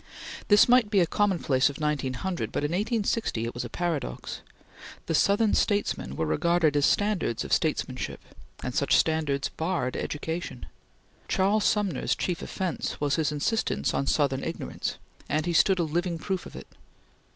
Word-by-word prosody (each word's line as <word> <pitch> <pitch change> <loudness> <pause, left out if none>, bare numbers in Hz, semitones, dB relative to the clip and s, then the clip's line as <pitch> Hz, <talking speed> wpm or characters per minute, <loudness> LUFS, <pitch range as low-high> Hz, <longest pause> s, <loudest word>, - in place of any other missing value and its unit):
This 205 -1 +6
might 245 -3 +5
be 205 -2 +3
a 175 - +5
commonplace 165 -9 +2
of 145 - -7
1900, 150 +4 -2
but - - -2
in 145 - -1
1860 210 - 0
it 115 - -4
was 120 - -4
paradox. 165 - -3 0.6
The - - -2
Southern 205 +6 +3
statesmen 205 - 0
were 80 - -1
regarded 165 - +2
as 145 0 +4
standards 205 - +1
of - - -3
statesmanship, 130 -5 -1 0.4
and 125 - -3
such 140 - +2
standards 145 -4 +1
barred 160 -6 -2
education. 160 -3 -4 0.6
Charles 200 +3 +2
Sumner's 200 - +1
chief 180 -3 -2
offence 185 -3 -3
was 145 0 +1
his 155 -2 +1
insistence 150 +10 0
on 135 - -1
Southern 135 -3 +1
ignorance, - - -4 0.3
and 155 +2 0
he 175 - -1
stood 190 +3 +4
a 175 - +1
living 170 +2 -1
proof 190 +2 -3
of - - -13
it. - - -8
165 Hz, 155 wpm, -27 LUFS, 140-190 Hz, 0.6 s, This